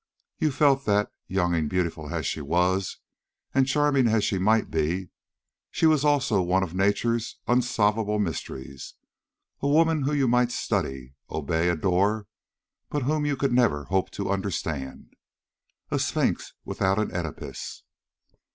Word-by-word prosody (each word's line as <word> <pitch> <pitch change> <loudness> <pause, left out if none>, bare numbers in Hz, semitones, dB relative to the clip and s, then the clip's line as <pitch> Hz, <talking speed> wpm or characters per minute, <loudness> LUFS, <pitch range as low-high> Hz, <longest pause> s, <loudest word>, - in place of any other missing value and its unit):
You 155 -4 +2
felt 140 0 +3
that, 105 0 +2 0.2
young 90 -2 0
and 80 -3 0
beautiful 85 -5 -2
as - - -2
she 80 - -2
was, 90 +5 0 0.6
and 135 -1 +3
charming 140 -2 +3
as 110 -2 +2
she 95 - 0
might 110 +1 +2
be, 80 +3 -1 0.6
she - - 0
was 155 -3 +4
also 135 -9 +3
one 90 +2 +2
of 90 -3 -5
nature's 105 +4 0
unsolvable 110 -3 +2
mysteries 70 -8 -5 0.6
a 140 - -1
woman 160 +1 +3
whom 145 +2 0
you 135 -2 +2
might 125 0 +3
study, 65 - -2 0.2
obey, 80 +2 0
adore, 95 +5 +1 0.6
but 145 -2 -2
whom 150 +2 0
you 145 -2 0
could 135 -2 0
never 115 -13 +3
hope 95 +2 0
to 100 -1 -3
understand; 80 -8 -4 0.8
a - - +1
Sphinx - - -1
without 95 +1 0
an 110 -3 -1
Oedipus. 85 -4 -6
100 Hz, 140 wpm, -26 LUFS, 90-130 Hz, 0.8 s, was